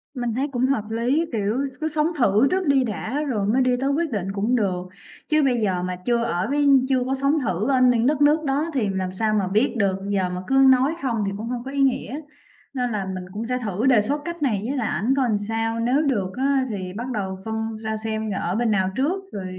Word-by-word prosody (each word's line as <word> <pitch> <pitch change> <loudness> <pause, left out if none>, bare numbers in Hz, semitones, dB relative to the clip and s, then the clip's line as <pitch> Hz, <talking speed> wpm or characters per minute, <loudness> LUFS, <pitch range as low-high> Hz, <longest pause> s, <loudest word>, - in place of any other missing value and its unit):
Mình 245 -3 -2
thấy 270 +4 -1
cũng 250 -1 +1
hợp 260 -5 +1
lý. 245 +8 +1
Kiểu, 215 +1 -1 0.2
cứ 315 - 0
sống 305 0 +1
thử 230 0 +4
trước 370 -2 0
đi 275 -2 +4
đã 235 +5 -3
rồi 205 -5 -1
mới 255 +5 +2
đi 255 0 +3
tới 275 - +1
quyết 310 +1 0
định 195 -2 -2
cũng 215 +5 0
được, 185 -6 0 0.5
chứ 305 -1 +3
bây 245 -4 +2
giờ 185 -3 0
mà 180 0 -2
chưa 235 -1 +2
ở 180 -6 -1
với 290 0 +2 0.2
chưa 260 -2 +2
có 265 +1 0
sống 275 +3 +1
thử 215 -1 -1
ở 260 -2 +3
những 245 -2 +4
đất 290 +1 +1
nước 300 +2 +4
đó 290 +4 0
thì 235 -7 0
làm 185 -1 -2
sao 215 +3 0
mà 200 -3 +1
biết 215 +8 +1
được, 195 -3 +2
giờ 190 -2 0
mà 180 0 -4
cứ 270 - +1 0.2
nói 260 +5 +3
không 230 -5 -1
thì 195 - -1
cũng 220 +2 -5
hông 245 -1 -3
có 270 - -7
ý 280 0 -1
nghĩa. 270 +2 0 0.5
Nên 250 -2 -1
là 205 -3 -2
mình 185 -1 -6
cũng 220 +3 -4
sẽ 250 +1 -1
thử 215 -1 -2
đề 250 -5 +5
xuất 285 +8 -2
cách 340 -1 -5
này 220 -9 +1
với 275 +4 -2
lại 230 -4 -1
ảnh 235 +6 0
coi 265 -2 +2
làm 215 -3 +1
sao, 225 +2 -2
nếu 250 +5 +2
được 210 -11 0
á 270 0 +2
thì 185 -3 -5
bắt 240 +2 -4
đầu 190 -3 -3
phân 220 0 -3
ra 220 0 -2
xem 220 0 -3
là 195 - -2
ở 175 +2 -2
bên 230 0 +1
nào 190 -2 +1
trước 350 +9 0
rồi 195 -2 -5
235 Hz, 255 wpm, -23 LUFS, 205-270 Hz, 0.5 s, đề